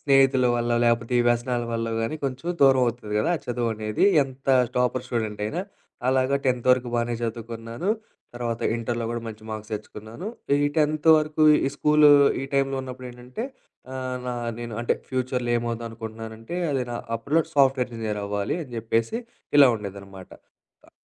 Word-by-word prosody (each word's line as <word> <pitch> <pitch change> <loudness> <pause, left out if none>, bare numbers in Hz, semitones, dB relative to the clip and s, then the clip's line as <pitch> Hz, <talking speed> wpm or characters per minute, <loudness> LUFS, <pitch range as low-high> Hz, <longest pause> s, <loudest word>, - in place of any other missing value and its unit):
స్నేహితుల 135 -2 +4
వల్ల 120 0 0
లేపోతే 115 +1 +1
ఈ - - +3
వ్యసనాల 120 +1 0
వల్లోగాని, 115 +3 -2
కొంచెం 135 +5 -3
దూరం 135 -1 +6
అవుతది 120 -3 -4
గదా! 105 - +1
ఆ - - -6
చదువనేది. 115 - -1 0.2
ఎంత 135 0 -9 0.3
టాపర్ 125 0 +1
స్టూడెంట్ 110 -4 -3
అయినా. 155 +12 -2 0.5
అలాగా 130 +1 +2
టెన్త్ 125 -1 0
వరకు 125 -1 +3
బానే 120 0 0
చదువుకున్నాను. 115 - -4 0.5
తర్వాత 120 -1 -3 0.2
ఇంటర్‌లో 115 0 -2
గూడా 120 -1 -3
మంచి 110 0 -9
మార్క్స్ 110 0 -6
తెచ్చుకున్నాను. 110 - -8 0.4
ఈ - - +4
టెన్త్ 155 0 +2
వరకు, 155 0 -1 0.2
ఈ - - +2
స్కూల్, 150 0 +5 0.4
ఈ - - -2
టైంలో 135 0 +1
ఉన్నప్పుడేంటంటే 125 - -7 0.5
ఆహ్, 130 -1 -3
నా 125 - -2 0.3
నేను 120 -2 -6
అంటే 120 - +1
ఫ్యూచర్‌లో 125 -1 -1
ఏమవుదాం 115 0 -3
అనుకుంటున్నానంటే 110 +3 -8 0.2
అది 135 -2 0
నా 120 - -3 0.2
అప్పట్లో 140 +8 +1
సాఫ్ట్‌వేర్ 135 -3 +3
ఇంజినీర్ 110 -2 -3
అవ్వాలి 100 +7 -2
అని 130 - -11
జెప్పేసి, 115 - -1 0.4
ఇలా 145 - +9
ఉండేదనమాట. 100 -2 -9 0.6
ఆహ్ - - -20
120 Hz, 150 wpm, -25 LUFS, 115-130 Hz, 0.6 s, ఇలా